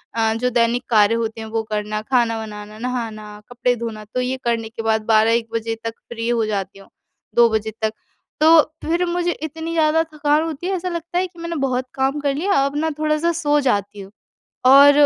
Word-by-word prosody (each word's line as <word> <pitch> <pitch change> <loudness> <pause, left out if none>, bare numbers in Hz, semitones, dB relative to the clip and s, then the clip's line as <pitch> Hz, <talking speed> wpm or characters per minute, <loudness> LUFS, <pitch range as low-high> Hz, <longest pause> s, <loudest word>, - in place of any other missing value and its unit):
अ, 225 -1 +2
जो 250 +2 0
दैनिक 240 +1 +1
कार्य 215 0 +4
होते 225 -1 -3
हैं 220 - -6
वो 225 0 -1
करना, 210 0 -2
खाना 230 -1 +1
बनाना, 210 0 -9
नहाना, 220 -4 -5
कपड़े 245 0 0
धोना 225 -2 -6
तो 250 - 0
ये 255 +1 -1
करने 230 -2 -1
के 225 - -6
बाद 220 -1 +1
12-1 225 +1 +3
बजे 225 0 -2
तक 225 - -2 0.2
फ्री 230 -1 -4
हो 230 -2 +1
जाती 195 -2 -3
हूँ, 195 - -16 0.5
2 235 -1 +6
बजे 220 0 -1
तक। 220 0 0 0.5
तो 320 0 +8 0.2
फिर 345 +2 +1
मुझे 350 0 0
इतनी 320 +2 -5
ज़्यादा 320 0 +3
थकान 300 +1 +2
होती 325 +2 -4
है 385 - 0
ऐसा 365 0 -3
लगता 340 0 -4
है, 370 +1 +1
कि 345 -1 -18
मैंने 335 0 -4
बहुत 260 -3 -1
काम 270 +2 0
कर 280 -1 0
लिया, 385 +7 0
अब 280 +1 -3
ना 320 +1 +1
थोड़ा-सा 310 +2 +1
सो 295 -3 +1
जाती 205 -5 -1
हूँ। 195 +1 -11 0.6
और 280 +2 +9
245 Hz, 205 wpm, -21 LUFS, 220-305 Hz, 0.6 s, और